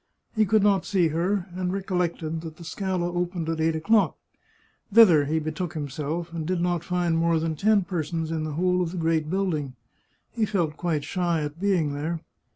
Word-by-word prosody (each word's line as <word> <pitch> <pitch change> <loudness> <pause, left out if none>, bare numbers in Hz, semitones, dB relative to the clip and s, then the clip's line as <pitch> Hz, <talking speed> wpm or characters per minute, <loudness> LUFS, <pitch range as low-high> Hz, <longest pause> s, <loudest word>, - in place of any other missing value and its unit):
He 215 -1 +3
could 215 +1 +3
not 200 -3 +3
see 180 -5 +2
her, 175 +4 0
and 180 0 -2
recollected 175 -4 -2
that 160 -1 -8
the 170 - -11
Scala 180 -1 -2
opened 175 -1 -2
at 160 -1 -1
eight 160 0 +2
o'clock. 205 +7 +2 0.7
Thither 190 -9 +7
he 155 +3 0
betook 160 +2 -3
himself, 155 +3 -4
and 165 -2 -3
did 180 +2 -1
not 175 -1 0
find 175 -2 0
more 165 0 +2
than 160 0 -1
ten 205 +4 +3
persons 165 -2 -3
in 160 -1 -1
the 155 -1 -3
whole 180 +3 +1
of 170 -2 -1
the - - -4
great 160 -2 0
building. 160 -8 -1 0.6
He 225 -3 0
felt 170 -7 0
quite 160 -4 -1
shy 175 -2 0
at 150 +2 -5
being 180 -8 +1
there. 160 +4 -3
170 Hz, 190 wpm, -25 LUFS, 160-185 Hz, 0.7 s, Thither